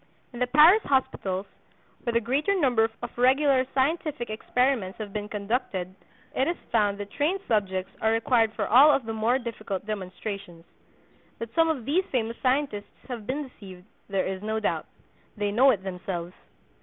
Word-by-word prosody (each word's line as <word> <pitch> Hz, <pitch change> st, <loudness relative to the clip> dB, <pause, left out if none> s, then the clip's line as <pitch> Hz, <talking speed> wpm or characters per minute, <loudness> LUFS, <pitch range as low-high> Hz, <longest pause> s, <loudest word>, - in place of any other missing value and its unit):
In 240 Hz, -, -8 dB
the 250 Hz, -, +1 dB
Paris 310 Hz, -, +7 dB
hospitals, 200 Hz, -, -1 dB, 0.6 s
where 235 Hz, -, -2 dB
the 230 Hz, -, +4 dB
greater 285 Hz, -, 0 dB
number 240 Hz, -7 st, +3 dB
of 240 Hz, -, -6 dB
regular 265 Hz, +1 st, +4 dB
scientific 290 Hz, -3 st, 0 dB
experiments 230 Hz, -3 st, 0 dB
have 210 Hz, -3 st, -7 dB
been 210 Hz, 0 st, -4 dB
conducted, 200 Hz, -3 st, -2 dB, 0.4 s
it 265 Hz, -, +2 dB
is 345 Hz, -, -1 dB
found 205 Hz, -3 st, +2 dB
that 205 Hz, 0 st, -7 dB
"trained 320 Hz, +7 st, 0 dB
subjects" 190 Hz, -4 st, 0 dB
are 220 Hz, -, +3 dB
required 225 Hz, 0 st, +2 dB
for -, -, -1 dB
all 265 Hz, +7 st, +7 dB
of 275 Hz, -5 st, +2 dB
the 225 Hz, -, -3 dB
more 225 Hz, +3 st, +2 dB
difficult 215 Hz, -6 st, -5 dB
demonstrations. 190 Hz, -3 st, -6 dB, 0.7 s
That 230 Hz, 0 st, -7 dB
some 330 Hz, 0 st, +3 dB
of 275 Hz, -8 st, -2 dB
these 325 Hz, +8 st, +2 dB
famous 230 Hz, -2 st, -1 dB
scientists 255 Hz, -6 st, -1 dB
have 230 Hz, -4 st, -6 dB
been 280 Hz, +2 st, -2 dB
deceived, 190 Hz, -7 st, -13 dB, 0.2 s
there 195 Hz, -1 st, 0 dB
is 190 Hz, 0 st, -4 dB
no 220 Hz, +1 st, -2 dB
doubt. 215 Hz, -, -1 dB, 0.5 s
They 205 Hz, -1 st, -1 dB
know 255 Hz, +6 st, +5 dB
it 200 Hz, -7 st, +1 dB
themselves. 180 Hz, -2 st, -5 dB
225 Hz, 170 wpm, -26 LUFS, 200-265 Hz, 0.7 s, Paris